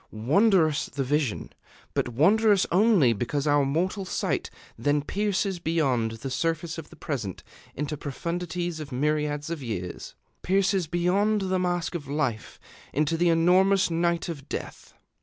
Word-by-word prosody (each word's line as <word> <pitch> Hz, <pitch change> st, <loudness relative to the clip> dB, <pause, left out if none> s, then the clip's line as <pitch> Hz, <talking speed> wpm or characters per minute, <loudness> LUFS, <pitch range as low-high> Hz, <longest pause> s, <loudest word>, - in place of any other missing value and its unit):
Wondrous 155 Hz, -, +2 dB
the 140 Hz, -, -3 dB
vision 140 Hz, -3 st, -1 dB, 0.4 s
but -, -, 0 dB
wondrous 200 Hz, -, +4 dB
only 185 Hz, -, +4 dB
because 130 Hz, +7 st, -2 dB
our 145 Hz, -1 st, +3 dB
mortal 175 Hz, +8 st, -1 dB
sight 185 Hz, -, -2 dB, 0.3 s
then 145 Hz, +5 st, 0 dB
pierces 195 Hz, +1 st, -1 dB
beyond 135 Hz, -9 st, 0 dB
the 115 Hz, +4 st, -6 dB
surface 165 Hz, +4 st, -2 dB
of 155 Hz, -, -10 dB
the -, -, -14 dB
present 110 Hz, -, -5 dB, 0.3 s
into 150 Hz, +2 st, -3 dB
profundities 170 Hz, +3 st, -4 dB
of 150 Hz, -2 st, -7 dB
myriads 150 Hz, +3 st, -1 dB
of 165 Hz, -3 st, -4 dB
years, 90 Hz, -8 st, -5 dB, 0.3 s
pierces 190 Hz, -2 st, +1 dB
beyond 195 Hz, +6 st, +1 dB
the 190 Hz, -1 st, 0 dB
mask 175 Hz, -2 st, -1 dB
of 155 Hz, -6 st, -5 dB
life 140 Hz, -7 st, -2 dB, 0.3 s
into 150 Hz, +3 st, +1 dB
the 175 Hz, +1 st, +2 dB
enormous 180 Hz, +3 st, +4 dB
night 170 Hz, 0 st, 0 dB
of 145 Hz, -5 st, -7 dB
death. -, -, -7 dB
160 Hz, 140 wpm, -26 LUFS, 140-180 Hz, 0.4 s, wondrous